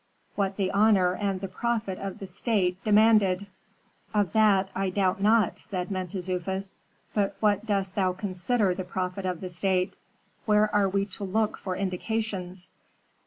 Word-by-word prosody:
"What 195 -1 -1
the 190 -2 0
honor 200 -3 +4
and 195 -1 -2
the 195 - -3
profit 215 0 -2
of 195 -1 -5
the 195 - -7
state 185 -1 -1
demanded." 210 -3 +4 0.7
"Of 205 -5 +1
that 200 -3 +4
I 195 0 -1
doubt 190 0 0
not," 220 +1 +3
said 185 -3 -4
Mentezufis. 185 +1 -3 0.4
"But 200 -2 0
what 210 0 +1
dost 195 -2 0
thou 185 -2 +1
consider 195 +2 0
the 185 +1 -4
profit 185 +1 -3
of 180 -2 -3
the 185 - -5
state? 185 +1 0 0.5
Where 210 0 +3
are 205 -2 +3
we 195 +1 0
to 205 0 -6
look 215 +3 0
for 185 -2 -4
indications?" 190 -1 -3
195 Hz, 155 wpm, -27 LUFS, 185-210 Hz, 0.7 s, honor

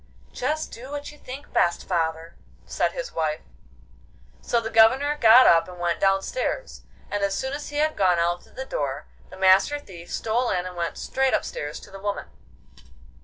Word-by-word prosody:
'Just 305 +5 -2
do 250 +3 -10
what 290 0 -6
you 295 - -16
think 270 +3 -10
best, 170 0 +1
father,' 165 -1 -2 0.3
said - - -1
his - - -5
wife. 155 -1 -1 1.0
So 235 - +1
the 225 0 -5
Governor 260 +7 +5
got 245 -2 +7
up 165 -1 +5
and 180 -1 -10
went 175 -1 -1
downstairs, 195 - -1 0.3
and 205 -1 -1
as 200 -1 0
soon 265 +1 -3
as 290 +1 -5
he 290 - -9
had 305 +1 +1
gone 185 -3 +3
out 175 +1 0
through - - -22
the 265 - -5
door, 140 - -3 0.2
the 185 - -12
Master 190 +9 +4
Thief 175 -11 -12
stole 235 +3 0
in 180 -1 -1
and 180 0 -7
went 170 -1 -3
straight 265 0 +1
upstairs 145 0 -4
to - - -14
the 195 - -9
woman. 205 +1 -3
200 Hz, 185 wpm, -24 LUFS, 175-265 Hz, 1.0 s, got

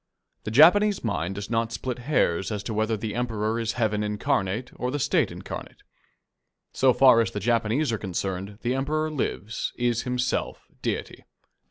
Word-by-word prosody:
The - - -2
Japanese 180 - +5
mind 95 -4 -2
does 100 +2 -6
not 115 0 0
split 125 +4 -4
hairs 115 - +1
as 105 -2 -3
to 110 - -4
whether 110 +1 0
the 105 0 -4
Emperor 115 -2 -1
is 115 0 -1
Heaven 110 -3 0
incarnate 105 +2 -1
or 125 - -3
the 145 - -2
State 140 0 +2
incarnate. - - -8 0.9
So 130 -1 +4
far 125 -2 +6
as 110 - 0
the 105 - -4
Japanese 115 +6 +1
are 110 - -2
concerned, 95 +1 -4
the 120 - +1
Emperor 155 +4 -1
lives, 115 -6 -3
is 120 -1 0
himself 125 0 -2 0.2
deity. - - -3
115 Hz, 165 wpm, -26 LUFS, 105-125 Hz, 0.9 s, far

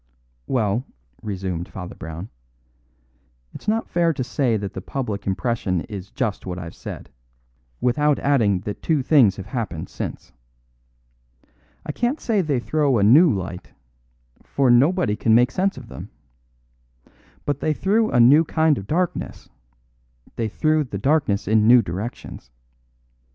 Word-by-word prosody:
"Well," 115 -2 0 0.4
resumed 95 -4 -4
Father 90 -2 -8
Brown, 80 +5 -8 1.2
"it's - - -11
not 225 +2 0
fair 170 -1 +1
to 130 - -3
say 125 -2 0
that 100 -1 -5
the 95 - -6
public 105 -3 -4
impression 95 -3 -1
is 100 -1 -8
just 115 -6 -3
what 90 -1 -4
I've 85 -2 -7
said, - - -9 0.7
without 145 +4 +2
adding 110 -10 +2
that 105 +1 -6
two 155 -5 +1
things 125 -10 +5
have 95 - -8
happened 95 -11 -4
since. - - -6 1.5
I - - -3
can't 240 - -1
say 215 -4 +1
they 145 -7 0
threw 145 0 +1
a 100 - +2
new 145 - +6
light; 90 -3 -5 0.7
for 135 -3 +1
nobody 140 - +3
can 110 +1 +2
make 125 +2 +4
sense 195 +4 0
of - - -10
them. 65 - -9 1.4
But 145 -1 -1
they 155 - 0
threw 210 +8 +1
a 125 - +2
new 140 +7 +7
kind 160 -2 +1
of 95 - -10
darkness; 175 +2 -2 0.9
they 115 - -1
threw 155 +7 +1
the 120 -7 -6
darkness 125 -4 +1
in 110 +1 +3
new 120 0 +7
directions. 95 - -7
120 Hz, 145 wpm, -22 LUFS, 100-150 Hz, 1.5 s, new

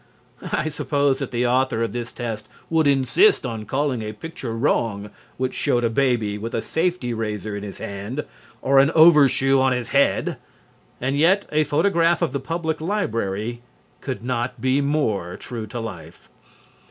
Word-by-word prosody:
I 150 - 0
suppose 145 -2 0
that 140 - -3
the 125 0 0
author 125 -2 +1
of 115 - -2
this 120 -1 -4
test 110 -3 -5 0.2
would 160 -2 +3
insist 140 - +4
on 110 -3 -4
calling 135 0 -1
a 110 0 -5
picture 120 -2 -6
wrong 105 -5 0 0.3
which 130 0 -1
showed 120 0 +1
a 115 - +1
baby 115 -5 +1
with 115 +2 -4
a 115 - 0
safety 165 -7 -1
razor 105 -2 -3
in 100 - -5
his 100 -1 -7
hand 100 +9 -5 0.4
or 135 0 +5
an 140 +1 +5
overshoe 140 -4 +6
on 130 -1 +3
his 125 -2 -3
head, 140 0 +2 0.6
and 130 +2 -1
yet 190 +6 +4
a 155 +1 +3
photograph 165 +3 +2
of - - 0
the 140 - -1
Public 160 +2 -3
Library 115 - -2 0.4
could 130 -4 -5
not 125 0 -2
be 130 +4 +2
more 110 - -1
true 115 -3 -6
to 120 +3 -6
life. 85 -7 -9
125 Hz, 165 wpm, -22 LUFS, 115-145 Hz, 0.6 s, overshoe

